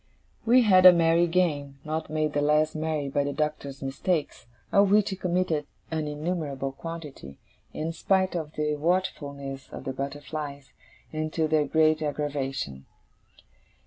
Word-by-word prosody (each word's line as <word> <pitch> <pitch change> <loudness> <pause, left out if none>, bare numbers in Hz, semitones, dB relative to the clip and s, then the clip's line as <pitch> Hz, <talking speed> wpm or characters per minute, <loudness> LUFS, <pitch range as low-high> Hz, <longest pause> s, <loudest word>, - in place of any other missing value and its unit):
We 250 +2 +6
had 185 -4 +7
a 180 - +10
merry 170 0 +4
game, 150 -6 0
not 155 +1 -3
made 155 -1 -1
the 145 - +1
less 150 +1 +3
merry 155 -2 -2
by 140 +1 0
the 140 0 -2
Doctor's 145 -3 -3
mistakes, 145 +1 -2 0.2
of 200 0 +5
which 210 0 +4
he - - -2
committed 180 -5 -1 0.2
an 155 -1 -1
innumerable 150 -3 -3
quantity, 145 - -8 0.3
in 160 +2 -3
spite 190 +2 +1
of 155 -3 -4
the 150 0 -1
watchfulness 140 -5 -2
of - - -8
the 135 - -4
butterflies, 140 0 -6 0.4
and 155 0 -2
to 160 -1 +1
their 155 -2 +2
great 155 +1 +3
aggravation. 135 - -3
155 Hz, 145 wpm, -27 LUFS, 140-165 Hz, 0.4 s, a